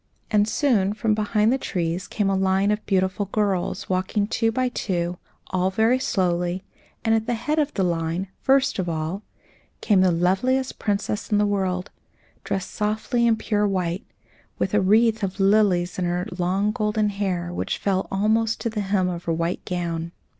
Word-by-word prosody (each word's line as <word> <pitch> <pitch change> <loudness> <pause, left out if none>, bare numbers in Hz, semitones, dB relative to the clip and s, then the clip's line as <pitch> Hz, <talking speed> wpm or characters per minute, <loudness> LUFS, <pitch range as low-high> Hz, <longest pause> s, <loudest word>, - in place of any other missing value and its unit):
And 210 -1 +3
soon 220 -6 +2
from 220 0 0
behind 215 +2 +2
the 265 - 0
trees 175 -3 -2
came 205 -2 -1
a 195 - +2
line 190 +1 +2
of 210 0 -1
beautiful 190 0 +1
girls, 200 -3 -1
walking 190 +3 0
two 225 +1 0
by 255 +2 0
two, 175 -6 -2 0.3
all 185 0 +1
very 225 +6 +2
slowly; 180 -5 0 0.4
and 225 - +3
at 225 0 +1
the 240 - +1
head 300 +7 -1
of 295 -1 +1
the 195 - +1
line, 170 +1 -1
first 270 -3 +3
of 180 -2 -1
all, 160 +4 -3 0.6
came 200 -4 +3
the 185 - +5
loveliest 195 +10 +1
princess 205 0 -2
in 210 - +4
the 210 - +3
world, 190 -2 -1 0.5
dressed 190 -1 -3
softly 220 +3 0
in 230 - +4
pure 210 -1 0
white, 185 0 -1 0.5
with 190 - -1
a 210 - +4
wreath 220 +3 +3
of 195 0 -3
lilies 195 -3 +3
on 180 - 0
her 175 +1 -1
long 190 +3 +1
golden 210 -1 0
hair, 185 -4 -2
which - - -2
fell 190 -2 0
almost 220 +3 +1
to 230 - -1
the 215 -1 -2
hem 195 -2 +1
of 175 -1 -4
her 165 - 0
white 170 +2 -2
gown. 170 -2 -3
195 Hz, 180 wpm, -24 LUFS, 180-215 Hz, 0.6 s, the